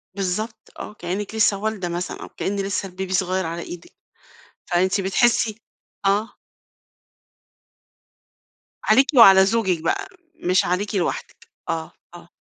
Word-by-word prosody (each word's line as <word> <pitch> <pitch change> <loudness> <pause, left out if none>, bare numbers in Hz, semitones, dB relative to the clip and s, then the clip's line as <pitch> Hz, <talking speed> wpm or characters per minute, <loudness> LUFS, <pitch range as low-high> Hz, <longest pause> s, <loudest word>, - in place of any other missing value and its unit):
بالضبط 205 +4 -4
آه، - - -7
كأنك 200 +2 -5
لسّه 215 -2 +3
والدة 205 -3 -3
مثلًا 175 +1 -4
أو - - -9
كأن 200 - -3
لسّه 195 0 -2
الBaby 185 +1 -6
صغير 185 0 0
على 165 +1 -4
إيدِك، 175 0 -9 0.8
فأنتِ 185 +3 +2
بتحسي 220 +2 +2 0.5
آه. 210 +4 +1 2.5
عليكِ 260 +6 +5
وعلى 195 -5 +9
زوجك 195 -5 +1
بقى، 165 - -1 0.3
مش 185 - +1
عليكِ 200 +4 -1
لوحدِك؟ 180 -3 -3 0.2
آه، 160 -1 -3 0.2
آه. 170 0 -13
195 Hz, 120 wpm, -22 LUFS, 180-210 Hz, 2.5 s, وعلى